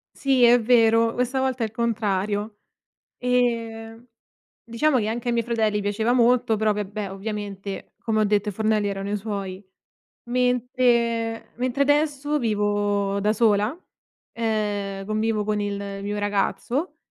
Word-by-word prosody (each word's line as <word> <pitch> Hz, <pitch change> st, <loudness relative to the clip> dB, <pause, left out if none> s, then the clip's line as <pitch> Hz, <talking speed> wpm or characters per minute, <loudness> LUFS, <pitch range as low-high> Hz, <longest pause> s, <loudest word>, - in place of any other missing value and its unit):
Sì, 265 Hz, -2 st, +2 dB
è 240 Hz, 0 st, +6 dB
vero, 230 Hz, -1 st, +4 dB
questa 250 Hz, +2 st, 0 dB
volta 260 Hz, -2 st, 0 dB
è -, -, +2 dB
il 220 Hz, -, -6 dB
contrario. 210 Hz, -2 st, -1 dB, 0.6 s
Ehm, 230 Hz, -2 st, -1 dB, 0.6 s
diciamo 255 Hz, +5 st, +1 dB
che 220 Hz, -, 0 dB
anche 230 Hz, +2 st, -3 dB
ai 240 Hz, -, +2 dB
miei 235 Hz, -1 st, 0 dB
fratelli 220 Hz, -3 st, +1 dB
piaceva 205 Hz, +3 st, 0 dB
molto, 245 Hz, -1 st, +3 dB
però 215 Hz, 0 st, +2 dB
vabbè, 205 Hz, -1 st, -4 dB
ovviamente, 200 Hz, -1 st, -6 dB
come 220 Hz, -2 st, 0 dB
ho -, -, +4 dB
detto, 210 Hz, 0 st, +1 dB
i -, -, -3 dB
fornelli 215 Hz, 0 st, +1 dB
erano 200 Hz, 0 st, -3 dB
i -, -, 0 dB
suoi. 200 Hz, -2 st, -5 dB, 0.7 s
Mentre 240 Hz, -2 st, +1 dB
mentre 255 Hz, +3 st, +1 dB
adesso 295 Hz, 0 st, +1 dB
vivo 205 Hz, -3 st, 0 dB
da 210 Hz, +1 st, +2 dB
sola, 215 Hz, +4 st, +2 dB, 0.6 s
ehm, 205 Hz, -3 st, -2 dB
convivo 215 Hz, 0 st, 0 dB
con 210 Hz, 0 st, -1 dB
il 200 Hz, -1 st, -4 dB
mio 205 Hz, +1 st, -3 dB
ragazzo, 240 Hz, -, -1 dB
220 Hz, 140 wpm, -24 LUFS, 205-240 Hz, 0.7 s, è